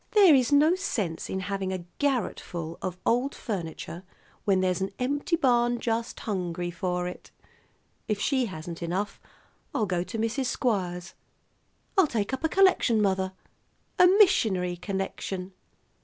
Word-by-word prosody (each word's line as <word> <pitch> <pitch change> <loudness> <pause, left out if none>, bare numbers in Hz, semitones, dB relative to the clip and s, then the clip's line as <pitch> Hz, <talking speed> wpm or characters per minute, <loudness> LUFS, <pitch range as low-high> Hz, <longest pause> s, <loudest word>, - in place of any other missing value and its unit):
There 400 -7 +8
is 260 -1 +3
no 300 +4 +6
sense 210 - -2
in 190 - -2
having 190 0 -2
a 185 -2 -4
garret 270 -7 0
full 165 -1 -6
of 185 -1 -3
old 250 +4 +1
furniture 170 -4 -5 0.4
when 195 -2 +3
there's 185 -1 +1
an 190 - 0
empty 285 +6 0
barn 240 -5 +2
just 230 0 -2
hungry 180 -4 -2
for 180 0 -2
it. 180 - -8 0.8
If 210 -2 -1
she 260 +2 +1
hasn't 165 -2 -7
enough, 185 +4 -2 0.6
I'll 215 - +2
go 180 -3 0
to 225 - -6
Mrs. 230 +4 -1
Squires. 180 -10 -1 0.9
I'll 365 - +6
take 225 -2 -2
up 265 - -3
a 320 - +2
collection, 370 - +4
mother, 190 -2 +1 0.7
a 360 - +9
missionary 220 - +4
collection." 190 0 -4
200 Hz, 145 wpm, -27 LUFS, 180-255 Hz, 0.9 s, a